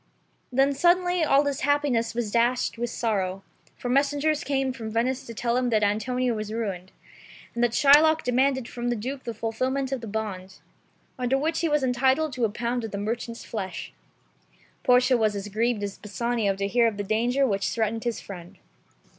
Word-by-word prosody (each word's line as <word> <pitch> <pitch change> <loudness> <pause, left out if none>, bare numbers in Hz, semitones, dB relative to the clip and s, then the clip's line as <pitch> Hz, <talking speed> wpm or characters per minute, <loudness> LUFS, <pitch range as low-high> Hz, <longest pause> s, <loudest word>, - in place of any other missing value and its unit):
Then 270 +2 +3
suddenly 355 +3 +3
all 285 -1 +4
his 280 -1 -1
happiness 275 -6 +1
was 230 -3 -2
dashed 240 +2 +1
with 240 0 -1
sorrow, 195 -5 -2 0.3
for - - -5
messengers 285 +3 +1
came 270 -2 0
from 225 -3 -6
Venice 245 +4 -1
to 230 - -7
tell 235 +2 0
him 250 -1 +1
that 215 -2 +2
Antonio 245 +4 0
was 215 -1 -4
ruined, 195 -5 -4 0.6
and 235 - -1
that 240 -1 +1
Shylock 310 +3 +6
demanded 260 0 +1
from 240 -1 -5
the 240 - 0
Duke 260 +5 -5
the 235 - -3
fulfilment 255 +5 -2
of 265 -3 -2
the 230 - -7
bond, 195 -3 -5 0.6
under 250 +1 +1
which 320 +3 -1
he 335 - 0
was 295 -2 +2
entitled 265 +4 +2
to 245 -3 +1
a - - 0
pound 235 +3 -2
of 225 - -4
the 200 - -5
merchant's 230 +3 -4
flesh. 195 -5 -5 0.9
Portia 250 0 +4
was 215 -2 +1
as 200 +1 -5
grieved 220 +1 0
as 200 -1 -5
Bassanio 210 0 -1
to 200 +1 -2
hear 235 +3 +3
of 215 -3 -2
the 205 - -2
danger 240 +6 +1
which 200 -5 0
threatened 225 0 -1
his 235 -2 -2
friend. 175 -3 -10
240 Hz, 190 wpm, -26 LUFS, 215-265 Hz, 0.9 s, Shylock